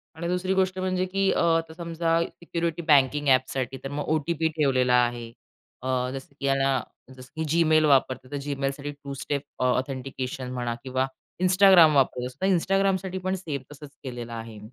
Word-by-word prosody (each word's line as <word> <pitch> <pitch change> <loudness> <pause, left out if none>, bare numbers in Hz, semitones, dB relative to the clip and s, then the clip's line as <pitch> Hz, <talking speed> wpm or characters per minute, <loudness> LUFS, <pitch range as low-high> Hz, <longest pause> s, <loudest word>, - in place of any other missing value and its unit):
आणि 170 +1 -4
दुसरी 180 +1 0
गोष्ट 190 0 +1
म्हणजे 185 0 0
की 195 +1 +1
अ, - - +1 0.2
आता 165 -1 -5
समजा 165 -1 -1
सिक्युरिटी 170 -1 -4
बँकिंग 145 0 +4
एपसाठी 130 0 +1
तर 135 - -4
मग 145 +1 -3
ओ. 155 - +2
टी. 170 - +1
पी. 160 0 0
ठेवलेला 130 -4 +2
आहे. 120 -1 -5 0.5
अ, 130 -1 -1
जसं 135 +1 -8
की 140 - -4
याला 135 -2 +2 0.4
जसं 130 +1 -12
की 160 - -2
जीमेल 155 -1 +4
वापरते 130 -2 +2
तर 145 - -3
जीमेलसाठी 140 0 -3
टू 140 -1 -9
स्टेप 140 +1 -3 0.2
अ, - - 0
ऑथेंटिकेशन 130 0 -2
म्हणा 120 -2 -2
किंवा 130 0 0 0.4
Instagram 185 -4 +7
वापरतो 125 -2 +2
तर 190 - +1
Instagramसाठी 190 +1 +1
पण 185 0 0
सेम 155 -8 -5
तसंच 150 0 -11
केलेलं 120 -2 -6
आहे. 115 -2 -7
145 Hz, 175 wpm, -26 LUFS, 130-170 Hz, 0.5 s, Instagram